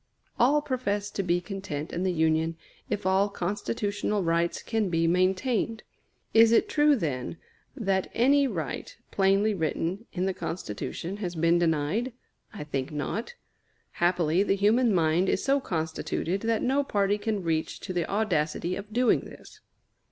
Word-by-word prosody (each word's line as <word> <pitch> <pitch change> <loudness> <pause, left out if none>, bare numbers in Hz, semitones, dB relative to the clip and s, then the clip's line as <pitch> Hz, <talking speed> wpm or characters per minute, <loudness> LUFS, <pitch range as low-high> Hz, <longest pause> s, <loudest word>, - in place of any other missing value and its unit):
All 290 +5 +4
profess 205 -7 -2
to - - -2
be 175 -2 +1
content 175 -5 -6
in 175 - -2
the 185 0 +1
Union 160 0 +1 0.3
if 205 - -2
all 190 +2 +3
constitutional 205 +1 -2
rights 170 0 0
can 220 -4 0
be 165 -1 +1
maintained. 190 +6 +1 0.5
Is 225 0 +7
it 235 - +4
true, 295 -6 +4
then, 150 - -3 0.4
that 195 -7 0
any 275 +4 +4
right, 165 - -5
plainly 195 +2 +3
written 180 +4 -2
in 185 0 -1
the 190 - 0
Constitution, 175 - -5
has 180 -4 -4
been 165 +1 +3
denied? 170 - 0 0.4
I 205 - -7
think 140 -2 -3
not. 200 - -4 0.6
Happily 175 0 +2
the 195 -1 +2
human 220 +4 +3
mind 170 0 +2
is - - 0
so 275 +1 +3
constituted 170 -1 -2
that 225 -1 0
no 275 +3 +2
party 205 -4 +1
can 210 -2 -2
reach 160 -1 -1
to 185 - -5
the 175 -2 -1
audacity 180 -4 0
of 205 +1 -8
doing 245 +2 +3
this. - - -13
190 Hz, 150 wpm, -27 LUFS, 165-220 Hz, 0.6 s, Is